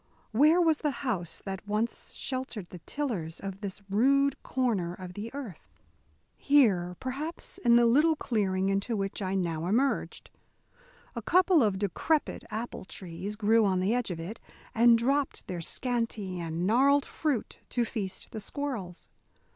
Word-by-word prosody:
Where 300 Hz, +9 st, +5 dB
was 325 Hz, -3 st, +3 dB
the 300 Hz, -, 0 dB, 0.2 s
house 185 Hz, -10 st, -2 dB
that 195 Hz, 0 st, -5 dB
once 215 Hz, +3 st, -2 dB
sheltered 255 Hz, -8 st, -3 dB
the 180 Hz, -, -8 dB
tillers 205 Hz, -, -3 dB
of 195 Hz, 0 st, -6 dB
this 200 Hz, 0 st, -6 dB
rude 275 Hz, +7 st, +3 dB
corner 210 Hz, -10 st, -1 dB
of 180 Hz, -1 st, -8 dB
the 210 Hz, +4 st, -6 dB
earth? 250 Hz, -, -8 dB, 0.7 s
Here, 200 Hz, -12 st, +3 dB
perhaps, 285 Hz, +6 st, -5 dB
in 235 Hz, -1 st, +5 dB
the 240 Hz, 0 st, +6 dB
little 300 Hz, +7 st, +4 dB
clearing 195 Hz, -8 st, 0 dB
into 200 Hz, +4 st, 0 dB
which 195 Hz, +1 st, -3 dB
I 190 Hz, 0 st, -1 dB
now 170 Hz, -3 st, -1 dB
emerged. 255 Hz, +8 st, 0 dB, 0.8 s
A -, -, -4 dB
couple 365 Hz, -2 st, +4 dB
of 205 Hz, -5 st, +2 dB
decrepit 210 Hz, -, 0 dB
apple 225 Hz, +2 st, -5 dB
trees 185 Hz, +3 st, -6 dB
grew 220 Hz, +1 st, +4 dB
on 190 Hz, -3 st, +2 dB
the 190 Hz, +4 st, +1 dB
edge 245 Hz, -3 st, 0 dB
of 175 Hz, -3 st, -4 dB
it, 185 Hz, +8 st, -6 dB, 0.3 s
and 235 Hz, 0 st, +6 dB
dropped 275 Hz, +4 st, 0 dB
their 175 Hz, -2 st, -5 dB
scanty 225 Hz, -3 st, -2 dB
and 165 Hz, +1 st, -2 dB
gnarled 275 Hz, +7 st, +4 dB
fruit 290 Hz, -8 st, -2 dB
to 240 Hz, -1 st, 0 dB
feast 200 Hz, -5 st, -5 dB
the 220 Hz, -, -5 dB
squirrels. 215 Hz, -8 st, -5 dB
220 Hz, 155 wpm, -29 LUFS, 190-260 Hz, 0.8 s, the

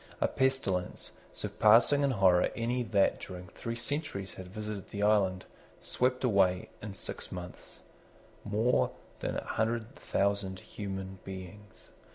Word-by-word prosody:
A -, -, +3 dB
pestilence, 130 Hz, -9 st, 0 dB, 0.2 s
surpassing 115 Hz, +7 st, +5 dB
in 140 Hz, -, +3 dB
horror 95 Hz, -7 st, +4 dB
any 120 Hz, +2 st, 0 dB
that 105 Hz, -5 st, +2 dB
during 90 Hz, -1 st, -8 dB
three 115 Hz, +6 st, -5 dB
centuries 120 Hz, -5 st, -3 dB
had 95 Hz, -, -8 dB
visited 105 Hz, 0 st, -6 dB
the 100 Hz, 0 st, -3 dB
island, 95 Hz, -3 st, +3 dB, 0.3 s
swept 125 Hz, +1 st, 0 dB
away, 95 Hz, -6 st, +3 dB
in 105 Hz, -2 st, -6 dB
six 95 Hz, -, -4 dB
mouths, 90 Hz, -1 st, -9 dB, 0.6 s
more 110 Hz, +4 st, +2 dB, 0.3 s
than -, -, -2 dB
a -, -, -3 dB
hundred 115 Hz, +3 st, -1 dB
thousand 100 Hz, -7 st, 0 dB
human 95 Hz, -1 st, -6 dB
beings. 95 Hz, +2 st, -10 dB
105 Hz, 130 wpm, -31 LUFS, 95-115 Hz, 0.6 s, surpassing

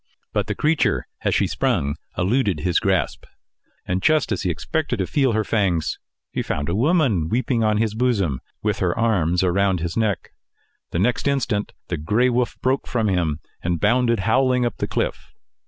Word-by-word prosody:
But -, -, 0 dB
the -, -, -2 dB
creature 150 Hz, -, +1 dB, 0.2 s
as -, -, +1 dB
she -, -, +3 dB
sprung 70 Hz, +1 st, 0 dB, 0.2 s
eluded 100 Hz, -, +1 dB
his 90 Hz, 0 st, +2 dB
grasp, 95 Hz, -5 st, 0 dB, 0.6 s
and 90 Hz, +1 st, -1 dB
just 155 Hz, 0 st, +2 dB
as 100 Hz, -, 0 dB
he 95 Hz, -, -1 dB
expected 135 Hz, -, -2 dB
to 95 Hz, -, 0 dB
feel 135 Hz, -, +1 dB
her 110 Hz, 0 st, +1 dB
fangs, 95 Hz, -8 st, 0 dB, 0.3 s
he -, -, -2 dB
found 70 Hz, +1 st, -3 dB
a 85 Hz, -, 0 dB
woman 125 Hz, -, +2 dB
weeping 120 Hz, 0 st, +1 dB
on 110 Hz, -1 st, +2 dB
his 110 Hz, -1 st, 0 dB
bosom, 105 Hz, -, 0 dB, 0.2 s
with 105 Hz, -1 st, 0 dB
her 90 Hz, +1 st, 0 dB
arms 90 Hz, -7 st, +2 dB
around 95 Hz, 0 st, +2 dB
his 85 Hz, 0 st, -3 dB
neck. 110 Hz, -4 st, -1 dB, 0.6 s
The -, -, -3 dB
next 120 Hz, +9 st, +1 dB
instant, 125 Hz, -7 st, 0 dB, 0.2 s
the 85 Hz, -, -1 dB
gray 110 Hz, +12 st, +2 dB
wolf 120 Hz, 0 st, 0 dB
broke 130 Hz, +2 st, +1 dB
from 115 Hz, -4 st, 0 dB
him, 80 Hz, -5 st, 0 dB, 0.2 s
and 85 Hz, -1 st, -1 dB
bounded 115 Hz, +1 st, +2 dB
howling 125 Hz, +3 st, +2 dB
up 120 Hz, -, -2 dB
the -, -, -2 dB
cliff. -, -, -3 dB
105 Hz, 180 wpm, -22 LUFS, 90-125 Hz, 0.6 s, she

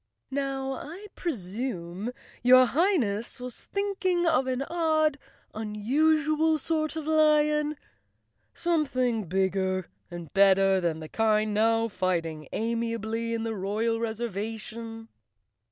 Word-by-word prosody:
"Now 270 Hz, -1 st, -2 dB
I 335 Hz, +9 st, -8 dB
presume 205 Hz, -, -4 dB, 0.3 s
your 255 Hz, +1 st, +7 dB
Highness 255 Hz, -, 0 dB
was 250 Hz, -1 st, -7 dB
thinking 380 Hz, -3 st, 0 dB
of 310 Hz, -6 st, +2 dB
an 260 Hz, +1 st, -1 dB
odd, 310 Hz, -2 st, +1 dB, 0.3 s
unusual 305 Hz, +9 st, +2 dB
sort 310 Hz, +1 st, -1 dB
of 315 Hz, -2 st, -4 dB
lion; 300 Hz, -1 st, +3 dB, 0.8 s
something 255 Hz, -, 0 dB
big¬ 190 Hz, +1 st, +1 dB
ger 185 Hz, -1 st, -1 dB, 0.2 s
and 175 Hz, -3 st, -8 dB
better 195 Hz, -1 st, +5 dB
than 165 Hz, -2 st, -1 dB
the 155 Hz, -, -7 dB
kind 215 Hz, +2 st, +1 dB
now 225 Hz, +2 st, +3 dB
fighting 165 Hz, -6 st, -2 dB
amiably 230 Hz, 0 st, -2 dB
in 225 Hz, -, -2 dB
the 225 Hz, -1 st, -2 dB
royal 215 Hz, +3 st, -1 dB
reservation?" 225 Hz, 0 st, -5 dB
230 Hz, 110 wpm, -27 LUFS, 205-300 Hz, 0.8 s, your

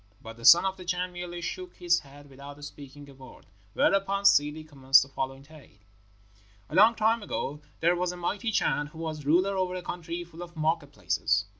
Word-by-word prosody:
But 115 Hz, 0 st, -10 dB
the 115 Hz, 0 st, -10 dB
Son 175 Hz, +3 st, +8 dB
of 190 Hz, 0 st, -2 dB
the 185 Hz, -, -10 dB
Chan 180 Hz, 0 st, -2 dB
merely 175 Hz, 0 st, -6 dB
shook 180 Hz, +1 st, -6 dB
his 175 Hz, -1 st, +2 dB
head 145 Hz, 0 st, -15 dB
without 140 Hz, +2 st, -12 dB
speaking 145 Hz, 0 st, -12 dB
a 140 Hz, -, -14 dB
word. 130 Hz, -, -15 dB, 0.3 s
Whereupon 195 Hz, 0 st, +1 dB
Ssidi 150 Hz, -5 st, +3 dB
commenced 135 Hz, -2 st, +4 dB
the 135 Hz, -, -14 dB
following 135 Hz, 0 st, -5 dB
tale: 145 Hz, -8 st, -17 dB, 0.9 s
"A -, -, -9 dB
long 220 Hz, +4 st, +6 dB
time 225 Hz, +1 st, +2 dB
ago 150 Hz, -7 st, -4 dB, 0.2 s
there 170 Hz, +2 st, +3 dB
was 180 Hz, 0 st, -1 dB
a 180 Hz, -, -9 dB
mighty 205 Hz, +6 st, -2 dB
Chan 145 Hz, -7 st, 0 dB
who 150 Hz, -, -15 dB
was 155 Hz, -3 st, -6 dB
ruler 185 Hz, +6 st, +3 dB
over 185 Hz, -1 st, -1 dB
a 180 Hz, -, -6 dB
country 175 Hz, 0 st, -5 dB
full 170 Hz, 0 st, -13 dB
of 175 Hz, 0 st, -10 dB
market 155 Hz, -2 st, -1 dB
places. 100 Hz, -, 0 dB
165 Hz, 200 wpm, -27 LUFS, 145-180 Hz, 0.9 s, Son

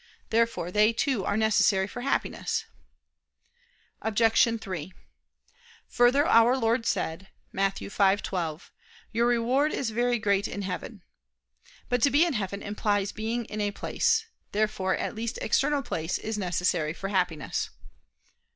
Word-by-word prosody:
Therefore 230 Hz, -6 st, +1 dB
they 210 Hz, +3 st, +4 dB
too 245 Hz, -4 st, 0 dB
are -, -, 0 dB
necessary 215 Hz, -3 st, +3 dB
for 240 Hz, +5 st, -7 dB
Happiness. 270 Hz, +2 st, -1 dB, 1.4 s
Obj. 225 Hz, +1 st, +3 dB
3: 185 Hz, -4 st, -6 dB, 1.0 s
Further, 250 Hz, +4 st, +4 dB
Our 240 Hz, -1 st, +5 dB
Lord 230 Hz, -1 st, +1 dB
said 165 Hz, +4 st, -2 dB, 0.2 s
(Matt. 195 Hz, 0 st, 0 dB
5:12): 190 Hz, -5 st, -1 dB, 0.4 s
"Your 235 Hz, +1 st, +2 dB
reward 245 Hz, +5 st, +2 dB
is 245 Hz, -5 st, -2 dB
very 240 Hz, +2 st, +1 dB
great 200 Hz, -2 st, +1 dB
in 200 Hz, -, -5 dB
heaven." 190 Hz, +1 st, -6 dB, 0.8 s
But 245 Hz, -2 st, 0 dB
to 285 Hz, -, +5 dB
be 290 Hz, +6 st, +4 dB
in 340 Hz, -, -1 dB
heaven 200 Hz, -3 st, -3 dB
implies 205 Hz, -1 st, -1 dB
being 225 Hz, +2 st, -3 dB
in 215 Hz, -1 st, -5 dB
a 205 Hz, -, +1 dB
place. 450 Hz, -, 0 dB, 0.3 s
Therefore 205 Hz, -3 st, 0 dB
at -, -, -3 dB
least 230 Hz, 0 st, -4 dB
external 280 Hz, +5 st, +1 dB
place 160 Hz, -5 st, -2 dB
is 220 Hz, 0 st, -4 dB
necessary 175 Hz, -5 st, 0 dB
for 195 Hz, +2 st, -5 dB
Happiness. 180 Hz, -7 st, -1 dB
215 Hz, 135 wpm, -27 LUFS, 195-235 Hz, 1.4 s, Our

